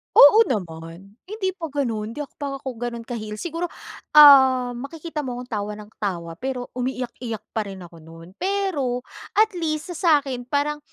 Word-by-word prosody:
Oo 430 +10 +9
naman. 175 0 -6
Hindi 390 -1 -2
pa 330 - -3
ganun, 230 -7 -3
hindi 295 - -4 0.2
pa 280 -1 -3
ako 260 -3 -6
ganun 235 -1 -4
ka-heal. 220 -2 -6
Siguro, 335 +9 -3 0.5
ah, 265 -4 +8
makikita 300 +4 -6
mo 250 - -3
akong 245 0 -8
tawa 210 -2 -3
ng 210 0 -11
tawa 170 -5 -3
pero 255 -1 -4
umiiyak-iyak 250 -3 -4
pa 220 -2 -2
rin 195 -2 -8
ako 170 -1 -13
nun. 165 +2 -13
Pero 350 -10 -1 0.3
at 435 +1 +4
least 315 +1 -2
sa 325 -3 +3
sa'kin 255 -3 -5
parang, 290 +3 0
255 Hz, 165 wpm, -23 LUFS, 215-300 Hz, 0.5 s, Oo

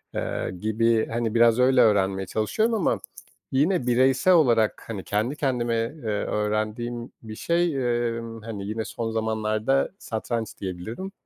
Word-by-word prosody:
eee, - - -2
gibi, 110 +1 +1
hani, 115 0 -2
biraz 115 +1 +5
öyle 130 0 +5
öğrenmeye 95 -2 +2
çalışıyorum 110 - 0
ama 205 - +1 0.5
yine 145 0 +1
bireysel 130 +8 +4
olarak, 120 -10 +3
hani, 105 -5 -5
kendi 110 +7 -1
kendime, 120 -5 0
eee, 115 +7 -3
öğrendiğim 110 +3 -2
bir 110 -1 -8
şey, 170 +2 +1 0.4
emm, 115 -1 -7
hani, 110 -3 -6
yine 110 +1 -3
son 115 -1 -4
zamanlarda 110 +4 0
satranç 110 -1 -4
diyebilirim. 105 - -5
115 Hz, 135 wpm, -25 LUFS, 110-130 Hz, 0.5 s, biraz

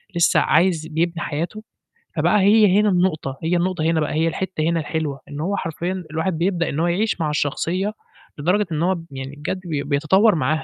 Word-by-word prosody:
لسّه 170 -1 +4
عايز 165 -1 +2
بيبني 165 +1 -1
حياته، 170 +8 -4 0.5
فبقى 210 - +3
هي 205 -1 +5
هنا 210 0 +3
النقطة، 175 -7 0
هي 165 +2 +1
النقطة 175 -1 -1
هنا 165 0 +2
بقى، 150 - -1
هي 160 +2 +1
الحتّة 180 +1 -3
هنا 165 +1 +1
الحلوة 155 -3 -3
إن 145 0 -7
هو 200 +5 -1
حرفيًا 180 +2 -3
الواحد 160 +2 -1
بيبدأ 170 -1 0
إن 140 - -3
هو 170 - +2
يعيش 200 +6 0
مع 155 - 0
الشخصية 170 +7 -1 0.4
لدرجة 180 +8 +1
إن 155 +1 -1
هو 185 +2 +2
ب 165 -2 -9
يعني 135 +1 -7
بجد 150 +5 -4
بي 150 -5 -2
بيتطوّر 155 +9 +3
معاها، 155 +1 0
165 Hz, 200 wpm, -21 LUFS, 155-185 Hz, 0.5 s, هي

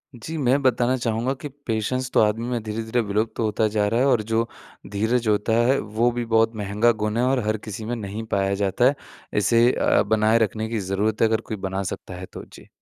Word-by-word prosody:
जी। 155 +7 -7
मैं 135 0 +2
बताना 125 0 +2
चाहूँगा 120 +2 -1
कि 145 - -4 0.2
पेशेंस 125 +3 -1
तो - - +3
आदमी 110 +3 +1
में 120 -2 -2
धीरे-धीरे 110 +2 -2
विलुप्त 110 +1 -2
होता 110 -1 +1
जा 105 -1 +2
रहा 115 +3 +1
है 135 - +3
और 120 -5 +3
जो 115 +1 +1 0.4
धीरज 110 +4 0
होता 105 +1 +1
है 135 - +3
वो 110 +3 0
भी 120 0 -3
बहुत 115 0 +3
महँगा 105 +3 +2
गुण 110 +1 -1
है 125 - +2
और 130 0 +2
हर 110 0 +1
किसी 105 +1 -6
में 120 +2 -2
नहीं 105 0 -5
पाया 100 0 +1
जाता 100 +4 +1
है। 140 +2 +4 0.4
इसे 115 +4 +4
अ, - - +2
बनाए 110 +1 +3
रखने 110 0 -1
की 115 -2 -2
ज़रूरत 100 +3 -1
है 115 - +6
अगर 110 0 0
कोई 110 - -6
बना 95 0 -3
सकता - - -9
है 90 +1 -7
तो। - - -7
जी। - - -16
110 Hz, 225 wpm, -23 LUFS, 105-120 Hz, 0.4 s, है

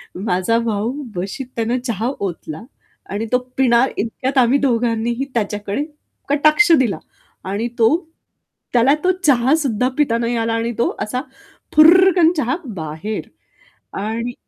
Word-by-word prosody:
माझा 185 +3 0
भाऊ 225 0 -1 0.2
बशीत 195 +9 -4
आहे 225 - 0
ना 245 +2 +1
चहा 230 +1 -1
ओतला 170 -4 -5 0.5
आणि 205 +3 -2
तो - - +6 0.2
पिणार 260 0 +3
इतक्यात 255 +5 -2
आम्ही 245 +3 +4
दोघांनीही 235 -1 0
त्याच्याकडे 210 +2 -2 0.5
कटाक्ष 305 +4 +4
दिला 235 -7 0 0.5
आणि 220 +4 -1
तो 225 - +5 0.8
त्याला 250 +5 +4
तो 370 - +4
चहा 265 -1 +4
सुद्धा 255 -6 0
पिता 260 -6 +2
नाही 235 +1 -1
आला 225 - -1
आणि 230 +1 -1
तो - - +1
असा 250 +4 -3 0.5
फुर्रकन 345 +1 +6
चहा 255 -1 0 0.2
बाहेर 160 +5 -5 0.7
आणि 230 +3 -3
235 Hz, 135 wpm, -19 LUFS, 215-270 Hz, 0.8 s, तो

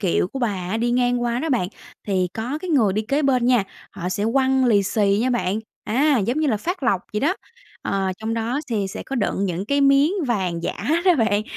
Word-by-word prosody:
kiệu 180 -1 +1
của 270 - -6
bà 240 -3 +1 0.2
á 215 - 0
đi 235 +2 0
ngang 245 0 +1
qua 240 0 0
đó 320 - -2
bạn, 230 -9 +1 0.4
thì 185 -3 +1
có 245 +7 -3
cái 370 - -4
người 230 - +3
đi 215 - 0
kế 275 +7 0
bên 255 -3 +2
nha, 245 -6 +3 0.3
họ 180 -3 -5
sẽ 200 +3 -1
quăng 265 0 +3
lì 210 -5 +4
xì 200 0 +1
nha 255 +2 +1
bạn. 215 -5 0 0.3
Á, 275 +5 +2
giống 235 +7 0
như 310 - +2
là 225 - +2
phát 355 - -4
lộc 190 - +2
vậy 210 - -1
đó. 320 +6 +2 0.5
Ờ, 195 -1 -1
trong 220 +1 -3
đó 230 +5 -1
thì 210 -4 0
sẽ - - -6
có 270 - -5
đựng 205 -3 0
những 180 0 -2
cái 280 +4 +1
miếng 275 +4 +4
vàng 185 -8 -1
giả - - -3 0.3
đó 365 -2 +6
bạn, 215 -6 +2
235 Hz, 240 wpm, -22 LUFS, 200-265 Hz, 0.5 s, đó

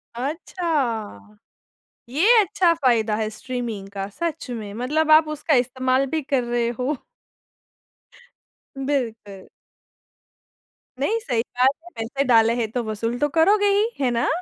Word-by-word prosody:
अच्छा! 260 - -3 0.7
ये 380 - +4
अच्छा 380 -4 +2
फायदा 235 -8 +1
है 215 0 -1
स्ट्रीमिंग 225 -4 -5
का 195 -1 -4
सच 325 +4 -4
में, 215 -4 -6
मतलब 300 +8 0
आप 310 0 +7
उसका 305 +1 -1
इस्तेमाल 260 +1 0
भी 320 - +1
कर 270 -3 0
रहे 240 0 0
हो। 265 +4 0 1.8
बिल्कुल। 230 -8 -3 1.5
नहीं 430 +12 0
सही 245 - -1
बात 250 +2 +2
है, 350 - -13
पैसे 235 +5 -2
डाले 230 -3 +4
हैं 230 -3 -1
तो 245 +1 -2
वसूल 230 +2 -3
तो 295 - +1
करोगे 405 +5 +4
ही, 430 +3 +2
है 255 -2 +2
ना? 235 0 0
255 Hz, 135 wpm, -23 LUFS, 230-305 Hz, 1.8 s, आप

